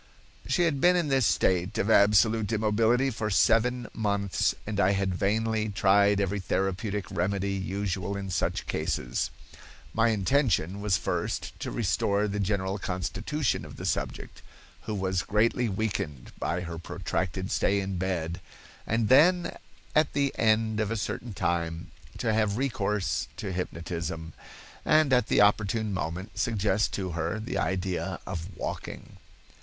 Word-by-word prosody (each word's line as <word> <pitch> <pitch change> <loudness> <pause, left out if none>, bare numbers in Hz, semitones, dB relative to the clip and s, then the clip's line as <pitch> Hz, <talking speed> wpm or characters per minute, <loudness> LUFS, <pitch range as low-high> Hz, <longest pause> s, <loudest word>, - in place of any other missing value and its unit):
"She 175 - +2
had 150 -5 +1
been 180 +1 +6
in 170 -4 +1
this 135 -4 +3
state 90 0 +1
of 100 - 0
absolute 110 +1 +4
immobility 115 +4 +2
for 110 -2 -3
seven 120 +4 +3
months 100 -3 0
and 105 -1 -3
I 100 0 +4
had 95 -1 0
vainly 110 +3 0
tried 100 0 +4
every 100 +1 0
therapeutic 95 +1 -1
remedy 100 +2 -1
usual 95 0 -2
in 95 -1 -5
such - - -1
cases. - - -1 0.6
My 115 +1 +3
intention 100 - +1
was 100 -4 +2
first - - -2
to - - -4
restore 100 +1 +1
the 105 0 -3
general 100 0 -1
constitution 100 +10 -2
of - - -10
the - - -7
subject, - - -3 0.5
who 110 - -2
was 95 -1 0
greatly 115 +4 +1
weakened 95 - -3
by 85 +1 -1
her 85 -2 -6
protracted 90 +1 -3
stay 100 0 +2
in 95 -2 -3
bed, 90 -2 -2 0.5
and 115 0 +1
then, 175 - +5 0.4
at 155 -1 +3
the 140 -1 +1
end 110 -1 +2
of 110 -2 0
a 115 - -1
certain 110 +2 -4
time, 85 -2 -2 0.3
to 110 - 0
have 105 -1 +1
recourse 105 -6 -1
to 100 - -4
hypnotism, 85 -2 -4 0.5
and 155 -3 +4
at 125 -3 +3
the - - +4
opportune 105 +1 +2
moment 90 +1 -4
suggest 105 -2 +1
to 95 -3 -3
her 85 +5 -2
the 110 - -3
idea 95 +1 -2
of 90 +2 -6
walking. - - -6
100 Hz, 145 wpm, -28 LUFS, 95-110 Hz, 0.6 s, been